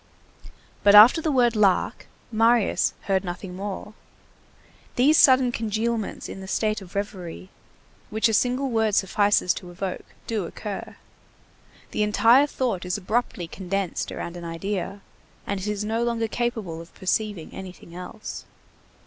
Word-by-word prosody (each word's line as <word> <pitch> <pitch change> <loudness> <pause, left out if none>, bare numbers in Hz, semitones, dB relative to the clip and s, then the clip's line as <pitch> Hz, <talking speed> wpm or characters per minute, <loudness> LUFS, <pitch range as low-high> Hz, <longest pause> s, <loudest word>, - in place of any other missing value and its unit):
But 205 0 +7
after 230 +10 +9
the 315 - 0
word 240 -4 +3
"Lark" 200 -4 +2 0.2
Marius 225 0 +3
heard 190 -1 0
nothing 180 0 -6
more. 200 +2 -6 1.0
These 280 +5 +5
sudden 260 -4 +6
congealments 225 -1 -2
in 195 - -8
the 190 - -8
state 215 +1 0
of 190 0 -13
reverie, 190 -3 -5 0.6
which 220 +2 +2
a 225 - -1
single 250 +4 +1
word 220 -2 +2
suffices 200 -1 +3
to 180 - -9
evoke, 185 +1 -6
do 215 -5 -2
occur. 200 +3 -6 1.0
The - - -1
entire 230 +6 +5
thought 245 -10 -2
is 180 +1 -2
abruptly 205 -3 -2
condensed 190 0 -3
around 170 - -6
an 175 - -8
idea, 195 +4 -4 0.4
and 200 -1 -2
it 190 - -5
is 210 0 -2
no 225 +2 -1
longer 230 -1 0
capable 220 -8 -3
of 170 - -15
perceiving 200 -2 -2
anything 185 -2 -10
else. 180 +4 -8
205 Hz, 140 wpm, -25 LUFS, 185-230 Hz, 1.0 s, after